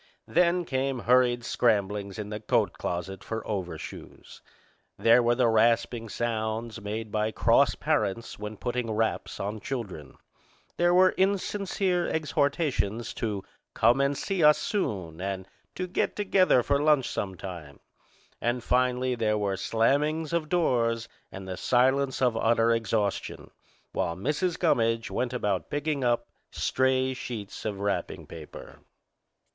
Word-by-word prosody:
Then 175 Hz, 0 st, +2 dB
came 135 Hz, -1 st, -1 dB
hurried 120 Hz, +1 st, +3 dB
scramblings 100 Hz, -4 st, 0 dB
in 105 Hz, -1 st, -5 dB
the 105 Hz, 0 st, -4 dB
coat 105 Hz, -, +1 dB
closet 90 Hz, +3 st, -4 dB
for 110 Hz, -1 st, -5 dB
over 95 Hz, -5 st, -3 dB
shoes. -, -, -11 dB, 0.6 s
There 115 Hz, +2 st, +5 dB
were 120 Hz, 0 st, +2 dB
the 125 Hz, -1 st, +3 dB
rasping 115 Hz, +1 st, +2 dB
sounds 110 Hz, 0 st, -3 dB
made 105 Hz, +1 st, -5 dB
by 110 Hz, 0 st, 0 dB
cross -, -, +3 dB
parents 105 Hz, +2 st, -1 dB
when 105 Hz, 0 st, -6 dB
putting 125 Hz, 0 st, -2 dB
wraps 110 Hz, +1 st, -1 dB
on 105 Hz, +2 st, -3 dB
children. 95 Hz, -, -6 dB, 0.6 s
There 175 Hz, 0 st, +3 dB
were 185 Hz, 0 st, +6 dB
insincere 190 Hz, -2 st, 0 dB
exhortations 140 Hz, -, 0 dB
to 105 Hz, -4 st, -3 dB, 0.3 s
"come 125 Hz, +3 st, +4 dB
and 140 Hz, 0 st, +1 dB
see 190 Hz, 0 st, -1 dB
us 150 Hz, 0 st, +7 dB
soon" 95 Hz, -, -3 dB
and 95 Hz, -1 st, -4 dB, 0.3 s
to 185 Hz, -, -2 dB
"get 180 Hz, -, -1 dB
together 190 Hz, -10 st, +3 dB
for 140 Hz, +2 st, +1 dB
lunch 150 Hz, -4 st, +3 dB
some 95 Hz, -2 st, -3 dB
time." 85 Hz, -7 st, -8 dB, 0.6 s
And, 120 Hz, 0 st, -1 dB
finally, 125 Hz, 0 st, +1 dB
there 110 Hz, -3 st, 0 dB
were 100 Hz, -2 st, 0 dB
slammings 145 Hz, -, +1 dB
of 160 Hz, -3 st, 0 dB
doors 115 Hz, -9 st, +1 dB, 0.2 s
and 95 Hz, 0 st, -8 dB
the 95 Hz, -1 st, -5 dB
silence 130 Hz, +2 st, +2 dB
of 125 Hz, -3 st, +3 dB
utter 115 Hz, +1 st, +3 dB
exhaustion, 110 Hz, -3 st, -1 dB, 0.4 s
while 85 Hz, -, -1 dB
Mrs. 150 Hz, -, -1 dB
Gummidge 115 Hz, -8 st, +1 dB
went 125 Hz, -1 st, -1 dB
about 105 Hz, -7 st, -1 dB
picking 145 Hz, -1 st, -1 dB
up 120 Hz, -1 st, +1 dB, 0.2 s
stray 130 Hz, 0 st, +1 dB
sheets 120 Hz, -7 st, -7 dB
of 105 Hz, -3 st, -3 dB
wrapping 100 Hz, 0 st, -2 dB
paper. 80 Hz, -2 st, -11 dB
120 Hz, 140 wpm, -27 LUFS, 105-140 Hz, 0.6 s, us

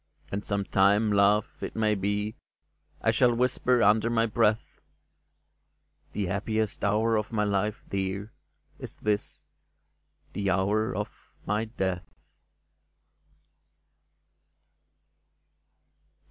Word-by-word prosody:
" -, -, -28 dB
And 100 Hz, +1 st, -3 dB
sometime, 100 Hz, +1 st, +2 dB
love, 100 Hz, +1 st, +4 dB
it -, -, -5 dB
may 110 Hz, -1 st, +2 dB
be, 105 Hz, +2 st, -1 dB, 0.7 s
I -, -, +4 dB
shall 120 Hz, -2 st, +3 dB
whisper 125 Hz, 0 st, +2 dB
under 110 Hz, +2 st, +4 dB
my 115 Hz, -1 st, +2 dB
breath: 110 Hz, -1 st, 0 dB, 0.6 s
*' -, -, -45 dB
The 105 Hz, -, -1 dB
happiest 105 Hz, +3 st, -2 dB
hour 110 Hz, +3 st, +2 dB
of 105 Hz, +1 st, -3 dB
my 105 Hz, -2 st, +1 dB
life, 105 Hz, +1 st, -1 dB
dear, 100 Hz, +2 st, -3 dB, 0.5 s
Is -, -, -8 dB
this 105 Hz, -1 st, -2 dB, 0.4 s
— -, -, -41 dB
the 100 Hz, -1 st, -1 dB
hour 100 Hz, +4 st, +1 dB
of -, -, -6 dB, 0.2 s
my 105 Hz, +2 st, 0 dB
death 95 Hz, -6 st, -3 dB
105 Hz, 105 wpm, -27 LUFS, 100-110 Hz, 0.7 s, love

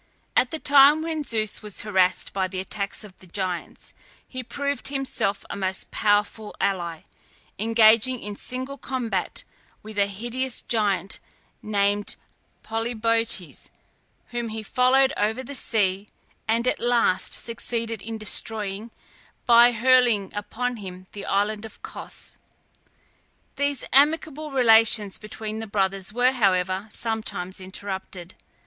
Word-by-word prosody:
At 250 Hz, -, +4 dB
the 320 Hz, -, -3 dB
time 290 Hz, +1 st, +6 dB
when 320 Hz, -2 st, -2 dB
Zeus 220 Hz, -5 st, 0 dB
was 210 Hz, -2 st, -1 dB
harassed 190 Hz, -3 st, +1 dB
by 190 Hz, -1 st, 0 dB
the 185 Hz, 0 st, -5 dB
attacks 200 Hz, +2 st, -1 dB
of 200 Hz, -3 st, -12 dB
the 185 Hz, -, -15 dB
Giants, 180 Hz, -1 st, -5 dB, 0.3 s
he 255 Hz, -, -6 dB
proved 280 Hz, +3 st, -3 dB
himself 270 Hz, -7 st, -2 dB
a -, -, -6 dB
most 190 Hz, -1 st, -1 dB
powerful 210 Hz, +1 st, 0 dB
ally, 170 Hz, -5 st, -1 dB, 0.6 s
engaging 225 Hz, +3 st, +4 dB
in 205 Hz, -1 st, -6 dB
single 260 Hz, +5 st, -4 dB
combat 235 Hz, -9 st, -3 dB, 0.4 s
with 215 Hz, -1 st, -6 dB
a 200 Hz, -, +4 dB
hideous 240 Hz, +5 st, -2 dB
giant 200 Hz, -5 st, 0 dB, 0.4 s
named 205 Hz, -1 st, 0 dB, 0.5 s
Polybotes, 225 Hz, -4 st, -1 dB, 0.6 s
whom 240 Hz, -1 st, -3 dB
he 220 Hz, 0 st, -5 dB
followed 260 Hz, +5 st, +3 dB
over 220 Hz, +5 st, 0 dB
the 280 Hz, -, -8 dB
sea, 200 Hz, -6 st, +1 dB, 0.4 s
and 230 Hz, +2 st, +1 dB
at -, -, +1 dB
last 235 Hz, -6 st, +1 dB
succeeded 230 Hz, -2 st, -3 dB
in 225 Hz, +1 st, -6 dB
destroying, 215 Hz, 0 st, 0 dB, 0.6 s
by 240 Hz, 0 st, +7 dB
hurling 240 Hz, -3 st, +3 dB
upon 240 Hz, +4 st, -3 dB
him 185 Hz, -3 st, -9 dB
the 200 Hz, -1 st, -7 dB
island 205 Hz, +2 st, 0 dB
of 220 Hz, -, -10 dB
Cos. -, -, -8 dB, 1.2 s
These 285 Hz, -2 st, 0 dB
amicable 305 Hz, +2 st, +3 dB
relations 225 Hz, -6 st, +4 dB
between 215 Hz, 0 st, -6 dB
the 225 Hz, -, -5 dB
brothers 195 Hz, -1 st, 0 dB
were, 245 Hz, +3 st, +3 dB
however, 190 Hz, -4 st, +1 dB
sometimes 210 Hz, -5 st, -3 dB
interrupted. 190 Hz, -1 st, -6 dB
220 Hz, 125 wpm, -24 LUFS, 200-245 Hz, 1.2 s, by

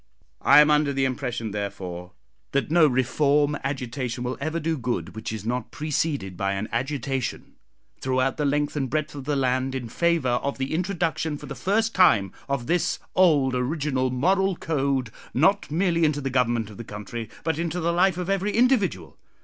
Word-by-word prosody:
I 150 Hz, -, +8 dB
am 150 Hz, 0 st, +4 dB
under 150 Hz, -1 st, +3 dB
the 135 Hz, -1 st, +1 dB
impression, 125 Hz, -4 st, -3 dB
therefore, 95 Hz, -3 st, -5 dB, 0.4 s
that 140 Hz, +2 st, 0 dB
no 165 Hz, -2 st, +6 dB
reform 145 Hz, +3 st, +2 dB
agitation 125 Hz, -2 st, -3 dB
will 125 Hz, +1 st, -2 dB
ever 155 Hz, +3 st, -1 dB
do 165 Hz, +1 st, -1 dB
good 120 Hz, -, -3 dB
which 110 Hz, 0 st, -5 dB
is 110 Hz, -2 st, -6 dB
not 125 Hz, +2 st, -2 dB
preceded 145 Hz, -, -2 dB
by 100 Hz, +2 st, -1 dB
an 100 Hz, +2 st, -3 dB
agitation, 135 Hz, +1 st, -3 dB, 0.5 s
throughout 130 Hz, 0 st, 0 dB
the 150 Hz, -, -1 dB
length 145 Hz, +1 st, 0 dB
and 135 Hz, -3 st, -1 dB
breadth 155 Hz, +1 st, -2 dB
of 140 Hz, -2 st, -8 dB
the 145 Hz, 0 st, 0 dB
land, 130 Hz, 0 st, 0 dB
in 120 Hz, -3 st, -4 dB
favour 155 Hz, -6 st, +1 dB
of 140 Hz, -, -3 dB
the 135 Hz, +2 st, -3 dB
introduction, 165 Hz, -3 st, -1 dB
for -, -, -10 dB
the -, -, -6 dB
first 220 Hz, +4 st, 0 dB
time, 110 Hz, -, +4 dB, 0.2 s
of 140 Hz, -3 st, -1 dB
this 175 Hz, +2 st, +1 dB, 0.2 s
old 150 Hz, -8 st, +4 dB
original 130 Hz, 0 st, 0 dB
moral 190 Hz, +9 st, +2 dB
code, 135 Hz, -8 st, -1 dB, 0.2 s
not 195 Hz, +9 st, +3 dB
merely 170 Hz, +1 st, +1 dB
into 150 Hz, -2 st, +2 dB
the 135 Hz, -2 st, -3 dB
government 120 Hz, -4 st, +1 dB
of 100 Hz, -, -12 dB
the -, -, -6 dB
country, 105 Hz, +2 st, -7 dB
but 160 Hz, -1 st, -1 dB
into 170 Hz, +1 st, -2 dB
the 170 Hz, 0 st, 0 dB
life 180 Hz, 0 st, +3 dB
of 180 Hz, -1 st, -3 dB
every 195 Hz, +1 st, 0 dB
individual. 210 Hz, -, +1 dB
140 Hz, 180 wpm, -25 LUFS, 125-160 Hz, 0.5 s, I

